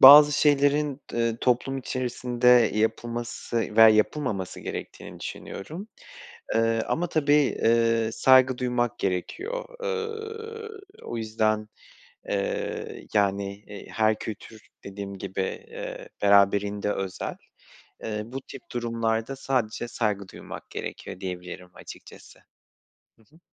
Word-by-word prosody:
bazı 145 +2 +11
şeylerin 145 0 +3
d - - -2
eee, 115 -1 +1
toplum 130 +2 +1
içerisinde 125 -1 -1 0.3
yapılması 115 0 -2
veya 110 0 +10
yapılmaması 110 -3 +1
gerektiğini - - -7
düşünüyorum. 165 - -7 0.7
Iıı, 115 0 +2
ama 175 +2 0
tabii, 145 -3 +3
ııı, 115 -1 +3
saygı 130 -1 +5
duymak 120 -1 0
gerekiyor. 360 - -2 0.2
Iıı, 445 -2 -5 0.2
o - - -5
yüzden, 110 -1 0 0.6
eee, 100 -1 -3
yani, 100 -1 +1
eee, 105 -1 -9
her 110 -1 +2
kültür 110 0 -8 0.2
dediğim 100 0 -6
gibi, 95 0 -3 0.3
eee, - - -7
beraberinde 100 0 +4
özel. 95 -1 -4 0.7
Eee, 105 -1 -2
bu 130 +4 -6
tip - - -10
durumlarda 115 +1 -1
sadece 125 -4 -1
saygı 105 -5 -1
duymak - - -9
gerekiyor - - -6
diyebilirim 90 -1 -6
açıkçası. - - -12 0.8
Hı 110 - -23
hı. - - -20
115 Hz, 110 wpm, -26 LUFS, 105-135 Hz, 0.8 s, bazı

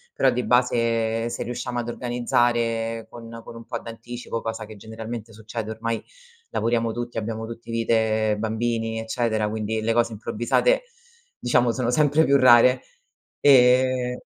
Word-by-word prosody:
Però 130 - +3
di 125 +1 -1
base 115 -2 +1
se 120 - -4
riusciamo 120 0 -4
ad 120 0 -2
organizzare 120 -2 0
con 115 -1 -11
con - - -10
un 115 - -10
po' - - -3
d'anticipo, 115 0 -7
cosa 110 -1 -4
che 110 0 -11
generalmente 110 +1 -7
succede, 110 +1 -6
ormai 115 +1 -3 0.5
lavoriamo 115 -1 0
tutti, 120 0 -4
abbiamo 110 +1 -4
tutti 115 0 -10
vite 110 -2 +1
bambini, 115 0 -1
eccetera, 110 -2 -1
quindi 110 +1 -2
le 115 +1 +1
cose 120 -1 +1
improvvisate 120 - +1 0.5
diciamo 120 -1 +2
sono 125 0 -1
sempre 150 +3 +3
più 140 - +3
rare, 125 0 +6 0.6
e 125 -2 +4
115 Hz, 140 wpm, -24 LUFS, 110-120 Hz, 0.6 s, rare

